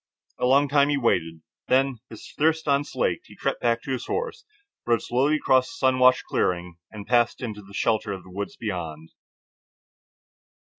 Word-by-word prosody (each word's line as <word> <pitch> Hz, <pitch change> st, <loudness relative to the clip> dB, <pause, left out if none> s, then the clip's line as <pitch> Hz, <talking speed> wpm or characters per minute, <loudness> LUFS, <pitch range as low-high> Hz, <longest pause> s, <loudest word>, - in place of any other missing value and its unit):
A -, -, +2 dB
long 140 Hz, +3 st, +4 dB
time 140 Hz, +1 st, +3 dB
he 145 Hz, -, +1 dB
waited, 80 Hz, -, 0 dB, 0.2 s
when, 130 Hz, -1 st, +2 dB
with 110 Hz, -, -11 dB
thirst 160 Hz, +1 st, +1 dB
unslaked, 140 Hz, -, 0 dB
he -, -, -15 dB
crept -, -, -2 dB
back 115 Hz, -1 st, +1 dB
to -, -, -5 dB
his 130 Hz, -, -3 dB
horse, 460 Hz, 0 st, -3 dB, 0.4 s
rode 115 Hz, -2 st, +2 dB
slowly 135 Hz, +5 st, +1 dB
across 130 Hz, -4 st, +3 dB
the 165 Hz, -, -10 dB
sun 130 Hz, -1 st, +2 dB
washed 130 Hz, 0 st, +5 dB
clearing, 90 Hz, -1 st, -1 dB
and 105 Hz, -2 st, -9 dB
passed 120 Hz, 0 st, +2 dB
into 110 Hz, -4 st, -5 dB
the 100 Hz, 0 st, -14 dB
shelter 110 Hz, -1 st, 0 dB
of 95 Hz, -2 st, -6 dB
the 95 Hz, -, -15 dB
woods 100 Hz, +2 st, -5 dB
beyond. 80 Hz, -7 st, -5 dB
120 Hz, 170 wpm, -25 LUFS, 100-135 Hz, 0.4 s, washed